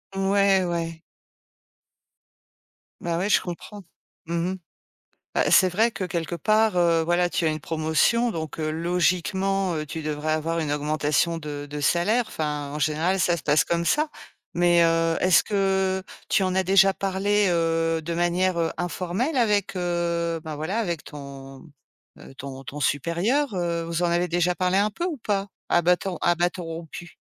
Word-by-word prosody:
Ouais, 195 -1 +3
ouais. 165 -1 -3 2.0
Ben 170 0 -1
ouais, 200 +3 -1
je - - +4
comprends. 190 +3 -8 0.4
Mmh 170 +2 -1
mh. - - -4 0.8
Bah, - - +1
c'est 185 - +6
vrai 220 +6 +2
que 185 - -4
quelque 170 -1 -3
part, 215 +3 +2
heu, 170 -2 +3
voilà, 175 +1 +1
tu 170 - -1
as - - +3
une 155 0 -2
promotion 160 +10 +1
donc, 160 -4 -5
heu, 155 -1 -2
logiquement, 180 +3 0
heu, 155 -1 -3
tu 160 +2 -6
devrais 155 0 -2
avoir 165 +2 -1
une 150 -2 -2
augmentation 150 +2 0
de 145 -2 -6
de 145 0 -5
salaire, 205 - +2
enfin, 150 -4 -3
en 150 - -4
général, 160 +6 +1
ça 175 -1 +2
se 165 - -8
passe 150 +1 +3
comme 170 0 0
ça, 300 - +2 0.5
mais, 175 0 +4
heu, 165 0 +2
est-ce 185 -3 +4
que 190 -2 0 0.3
tu 195 - +3
en 185 0 0
as 190 - +2
déjà 195 +1 +5
parlé, 200 +2 +1
heu, 165 -1 +1
de 170 +2 -4
manière, 175 +1 +1
heu, 165 -1 0
informelle 180 - -2
avec, 210 -5 +1
heu, 170 -2 -1
ben 155 -2 -6
voilà, 160 +9 -3
avec 170 -7 -2
ton, 140 0 -10 0.5
heu, - - -13
ton 135 0 -8
ton 145 +2 -7
supérieur, 175 - 0
heu, 170 -1 -1
vous 170 +1 -2
en - - +4
avez 175 0 +1
déjà 175 +1 +1
parlé 185 +1 +1
un 205 +1 +3
peu, 215 - -6
ou 350 -4 -2
pas? 205 -4 -2 0.2
À 175 - +3
bâtons 180 +1 +1
à 175 - +3
bâtons 175 +1 -1
rompus? 165 +1 -8
175 Hz, 175 wpm, -24 LUFS, 160-190 Hz, 2.0 s, c'est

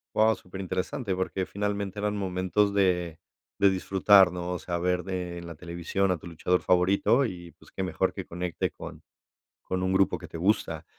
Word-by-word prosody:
Guau, 110 +1 +4
superinteresante, 95 +4 -4
porque 95 0 -2
finalmente 100 0 -3
eran 105 0 -1
momentos 95 +1 0
de 90 -4 +1 0.4
de 100 -1 +5
disfrutar, 95 0 +5
¿no? 90 0 -4
O 90 - -2
sea, 85 -1 -3
ver 90 +1 0
de 90 -1 -4
en 85 - -9
la 85 - -8
televisión 85 +4 -1
a 90 - 0
tu - - -10
luchador 90 +2 0
favorito 95 +8 +3
y, 85 -6 -7
pues, - - -20
qué - - -5
mejor 90 -3 0
que - - -6
conecte 90 0 -2
con - - -10 0.6
con 90 0 -3
un 95 0 +1
grupo 95 0 +3
que - - -10
te - - -8
gusta. 95 +6 0
95 Hz, 185 wpm, -27 LUFS, 90-100 Hz, 0.6 s, de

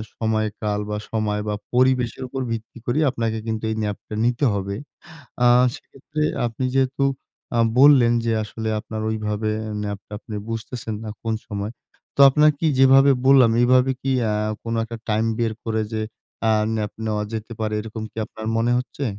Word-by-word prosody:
সময়কাল 110 -2 -1
বা, 105 - -2
সময় 105 -2 -1
বা, 105 - 0 0.2
পরিবেশের 125 -1 +2
উপর 135 +1 -4
ভিত্তি 115 +1 -5
করে 120 +5 0
আপনাকে 115 -2 -2
কিন্তু 110 0 -2
এই - - -2
ন্যাপটা 105 0 -5
নিতে 120 +3 +1
হবে। 100 0 -3 0.7
আ - - +7 0.3
সেক্ষেত্রে 155 +1 -7 0.3
আপনি 120 +3 -3
যেহেতু 135 +1 +1 0.5
আ - - +3 0.2
বললেন 135 -4 +7
যে, 115 - +1
আসলে 110 +1 -5
আপনার 110 0 -6
ওইভাবে 110 0 -2 0.3
ন্যাপটা 100 -1 -6
আপনি 110 -2 -8
বুঝতেছেন 115 0 -4
না 110 - -5
কোন 115 -1 -1
সময়। 100 +1 -4 0.4
তো - - -13
আপনাকি 150 +2 +3
যেভাবে 135 +1 +7
বললাম, 130 -4 +6
এইভাবে 130 +1 +4
কি 135 - -1 0.2
আ - - 0 0.3
কোন 115 - -3
একটা 115 +1 -7
টাইম 110 +1 +2
বের 115 -2 0
করে 110 -1 0
যে, 110 - -1 0.5
আ - - +5 0.2
ন্যাপ 105 -2 -2
নেওয়া 105 -1 -1
যেতে 110 +1 -5
পারে, 110 -1 -1
এরকম 110 0 -7
কি - - -22
আপনার 110 +1 -8
মনে 115 +1 +2
হচ্ছে? 125 +3 -5
115 Hz, 165 wpm, -22 LUFS, 110-125 Hz, 0.7 s, আ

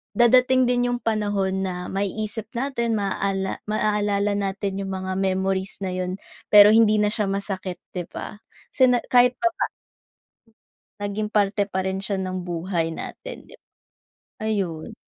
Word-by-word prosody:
dadating 255 +2 +5
din 245 0 +2
yong 245 - -3
panahon 205 -3 0
na 185 - -2 0.2
maiisip 210 +3 -3
natin, 235 -3 -1
maaalala 205 +1 -1
natin 195 0 -2
yong 195 -1 -4
mga 190 0 -4
memories 190 0 -1
na 185 - -2
yon 185 0 -2 0.3
pero 210 0 +8
hindi 220 -1 +5
na 210 0 +2
siya 210 -2 -1
masakit 195 -2 -4
di 180 -2 -4
ba? - - -7 0.4
Sine 255 -3 +5
kahit 250 0 +5
papa 345 -1 0 1.3
Naging 205 +1 -3
parte 205 -1 +1
pa 190 -1 -2
rin 190 0 -2
siya 200 0 -2
ng 185 -1 -3
buhay 175 -1 -2
natin - - -8
'di - - -16
ba? - - -69 0.8
Ayun. 190 -7 -2
200 Hz, 140 wpm, -24 LUFS, 190-220 Hz, 1.3 s, pero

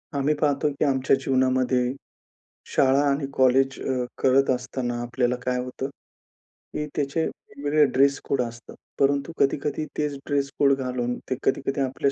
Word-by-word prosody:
आम्ही 140 +2 +2
पाहतो, 145 0 +2
की 140 +1 -1
आमच्या 135 -1 +3
जीवनामध्ये 130 -1 +2 0.9
शाळा 135 0 +4
आणि 140 +1 0
कॉलेज 135 +1 +3
अ, 130 -2 -1
करत 135 +1 +3
असताना, 125 -1 -2
आपल्याला 120 +1 0
काय 125 0 0
होतं, 125 +2 -4 0.8
की 150 - -2
त्याचे 145 +3 0
वेगवेगळे 145 +1 0
ड्रेस 140 +1 +4
कोड 135 -2 0
असतात 120 -1 -7 0.2
परंतु 140 +2 +2
कधी-कधी 145 +2 0
तेच 150 -1 -1
ड्रेस 140 -1 0
कोड 140 -1 +5
घालून, 125 -2 -2
ते 130 - 0
कधी-कधी 135 +1 0
आपल्या 135 +1 0
135 Hz, 145 wpm, -25 LUFS, 125-140 Hz, 0.9 s, कोड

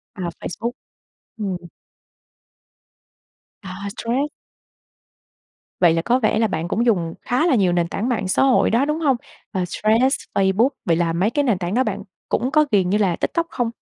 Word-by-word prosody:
À, 180 -3 -3
Facebook. 235 +7 -4 0.7
Ừm 195 -4 -2 2.1
À, 185 -1 -7 0.2
Threads. 260 +6 -1 1.5
Vậy 170 -2 +5
là 165 - 0
có 245 +5 +2
vẻ 215 -2 +1
là 225 - +3
bạn 165 -3 -3
cũng 235 +6 0
dùng 170 -7 +1
khá 255 +7 +1
là 280 - +3
nhiều 190 -5 +3
nền 170 -1 +1
tảng 220 +8 -2
mạng 215 -6 -1
xã - - +2
hội 265 -2 +4
đó, 240 +5 +3
đúng 300 +2 -1
hông? 275 -5 +3 0.4
Ờ, 185 -2 -1
Threads, 230 +6 +2 0.2
Facebook, 195 +6 +3 0.2
vậy 165 -1 +2
là 165 -1 +1
mấy 185 +6 +1
cái 290 +2 0
nền 220 -8 +2
tảng 180 +2 -3
đó 260 +1 +3
bạn 205 -1 -3 0.3
cũng 250 +4 0
có 305 0 +4
ghiền 185 -3 +3
như 210 - +2
là 185 -5 +1
TikTok 335 0 -1
không? 240 -3 -1
215 Hz, 180 wpm, -21 LUFS, 180-250 Hz, 2.1 s, Vậy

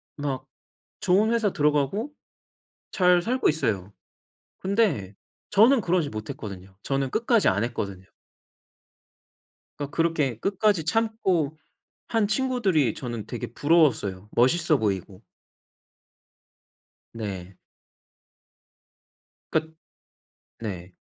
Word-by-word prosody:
막 140 -3 -3 0.5
좋은 205 +5 +3
회사 230 -4 +2
들어가고 150 - +1 0.8
잘 180 -1 +4
살고 250 +7 +1
있어요. 110 - -1 0.7
근데 185 - 0 0.3
저는 230 +5 +5
그러지 175 -5 +1
못했거든요. 100 -3 -7
저는 135 -1 -1
끝까지 230 - +2
안 100 +3 +2
했거든요. 100 -6 -4 1.7
그니까 145 -1 -5
그렇게 150 -8 0
끝까지 195 - +1
참고 190 -8 0 0.5
한 225 -3 +1
친구들이 215 - +1
저는 120 -4 -5
되게 120 -4 -5
부러웠어요. 135 - +2
멋있어 155 +6 +3
보이고. 100 -3 -2 1.9
네. 95 -5 -6 1.9
그 160 0 -1 0.9
네. 95 -5 -6
150 Hz, 200 characters per minute, -25 LUFS, -, 1.9 s, 저는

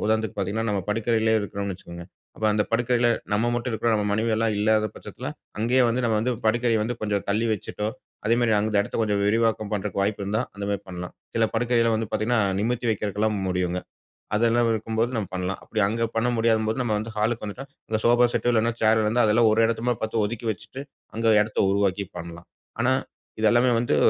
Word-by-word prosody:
உதாரணத்துக்கு 110 -1 0
பார்த்தீங்கன்னா, 100 +3 -1
நம்ம 100 -2 0
படுக்கறையிலே 110 +1 +1
இருக்குறோம்னு 100 -1 -4
வச்சிக்கங்க. 85 -1 -10 0.3
அப்ப 110 - -6
அந்த 105 0 +2
படுக்கறையில 120 +1 +2 0.2
நம்ம 115 +3 +2
மட்டும் 120 +1 -2
இருக்குறோம். 115 +1 +1
நம்ம 105 -1 0
மனைவி 110 +2 +1
எல்லாம் 110 -1 +1
இல்லாத 110 0 +3
பட்சத்தில - - -9 0.3
அங்கேயே 125 +4 +3
வந்து 125 +2 0
நம்ம 110 -2 +2
வந்து 125 +3 0 0.2
படுக்கைய 115 0 +2
வந்து 120 +3 -2
கொஞ்சம் 105 -2 -1
தள்ளி 110 +3 +1
வச்சிட்டோ! 105 +1 -3 0.4
அதேமாரி, 115 0 +3
அந்த 110 0 -2
இடத்த 100 - -3
கொஞ்சம் 105 -2 0
விரிவாக்கம் 110 -1 +1
பண்றக்கு 100 -1 -2
வாய்ப்பு 100 +1 -1
இருந்தா, 105 +3 0
அந்தமாரி 100 -1 -3
பண்லாம். 90 -1 -6 0.2
சில 115 - +4
படுக்கையில 115 0 +2
வந்து 110 0 -1
பார்த்தீங்கன்னா, 110 +2 +1 0.2
நிமிர்த்தி 120 +2 -1
வைக்கிறக்குலாம் 105 0 -1
முடியுங்க. 90 -1 -1 0.6
அதெல்லாம் 115 +1 +3
இருக்கும்போது 110 +2 -1
நம்ம 100 -4 -2
பண்லாம். 90 +1 -3
அப்பிடி 110 - -2
அங்க 115 +1 0
பண்ண 120 +2 +1
முடியாதம்போது 110 +1 +1
நம்ம 110 -3 0
வந்து 110 +1 -5
ஹாலுக்கு 110 +1 0
வந்துட்டா, 125 +7 -7 0.2
இந்த 110 -1 0
சோஃபா 120 +1 +5
செட் 120 - +1
இல்லன்னா, 115 +1 +2
சேர் 110 0 +4
இருந்தா 115 +3 +2
அதெல்லாம் 110 +1 +4
ஒரு 110 - +2
இடத்தமா 115 +2 0
பார்த்து 110 -1 0
ஒதுக்கி 115 +2 -4
வச்சிட்டு, 130 +7 -8 0.3
அங்க 115 0 0
இடத்த 105 +1 -2
உருவாக்கி 100 0 +1
பண்ணலாம். 85 0 -9 0.3
ஆனா, 130 +2 +3 0.5
இது 110 - +3
எல்லாமே 120 +1 +4
வந்து 120 +5 +1
110 Hz, 185 wpm, -25 LUFS, 105-115 Hz, 0.6 s, சோஃபா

